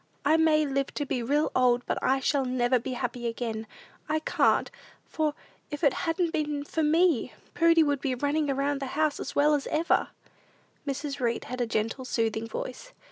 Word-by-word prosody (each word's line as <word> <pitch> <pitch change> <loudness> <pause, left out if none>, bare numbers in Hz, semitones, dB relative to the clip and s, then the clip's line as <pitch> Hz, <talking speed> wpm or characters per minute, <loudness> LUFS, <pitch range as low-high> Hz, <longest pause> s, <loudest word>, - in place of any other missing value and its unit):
"I 305 +2 +5
may 315 -1 +4
live 275 -1 -1
to 290 - -1
be 255 - -2
real 290 +6 +1
old; 245 -1 +3
but - - -1
I 265 - +3 0.2
never 255 -2 +1
shall - - +4
be 255 +2 -5
happy 245 -1 -3
again! 230 -1 -4 0.4
I 310 - +2
can't, 310 - +2 0.3
for, 305 -2 -1 0.3
if 295 +1 -6
it 280 - +5 0.2
hadn't 335 0 0
been 295 -2 -1
for 320 - -2
me? 320 -2 +2 0.2
Prudy 335 -1 +5
would 285 -2 0
be 260 -2 -1
running 290 +4 0
round 275 +1 0
the 275 - -4
house 310 -2 +1
as - - -6
well 295 +1 +4
as 290 -2 0
ever!" 325 +2 +1 0.8
Mrs. 280 +1 -3
Read 235 -2 0
had 250 0 -5
a 240 - 0
gentle, 225 +4 -2
soothing 225 -2 -1
voice. - - -6
280 Hz, 190 wpm, -28 LUFS, 250-310 Hz, 0.8 s, I